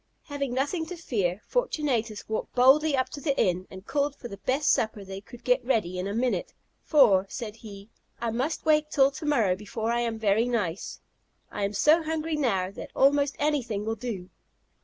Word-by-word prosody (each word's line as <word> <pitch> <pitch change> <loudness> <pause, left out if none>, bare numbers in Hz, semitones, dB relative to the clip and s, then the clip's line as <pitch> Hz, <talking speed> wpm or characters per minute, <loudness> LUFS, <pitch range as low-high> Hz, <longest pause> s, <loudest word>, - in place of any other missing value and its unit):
Having 280 -4 -4
nothing 320 +5 -1
to 360 - -6
fear, 205 - -2
Fortunatus 270 - -1
walked 220 - -4
boldly 275 +4 +5
up 260 - 0
to 285 - -8
the 280 -3 0
inn, 185 0 +1
and 190 +1 -11
called 285 +1 0
for 240 - -9
the 200 - -8
best 265 +8 +1
supper 215 -2 0
they 195 0 -7
could 235 +4 -14
get 250 +1 +2
ready 200 -8 0
in 185 - -2
a 200 - -3
minute; 245 +1 -1 0.3
"For," 210 - +4
said 225 -3 -6
he, 205 -1 -11 0.3
"I 235 -1 -1
must 265 +7 -2
wait 305 -1 +3
till 275 -2 +4
to 300 - -8
morrow 225 -11 +3
before 220 +3 -3
I 235 - +1
am 230 -2 -1
very 220 +2 +2
nice. 205 -8 -2 0.5
I 205 - -2
am 200 - -3
so 305 +10 +4
hungry 320 0 -2
now, 195 -11 0
that - - -8
almost 280 +1 +3
anything 245 -9 -1
will 225 - -1
do." 205 -6 -6
240 Hz, 195 wpm, -27 LUFS, 205-285 Hz, 0.5 s, boldly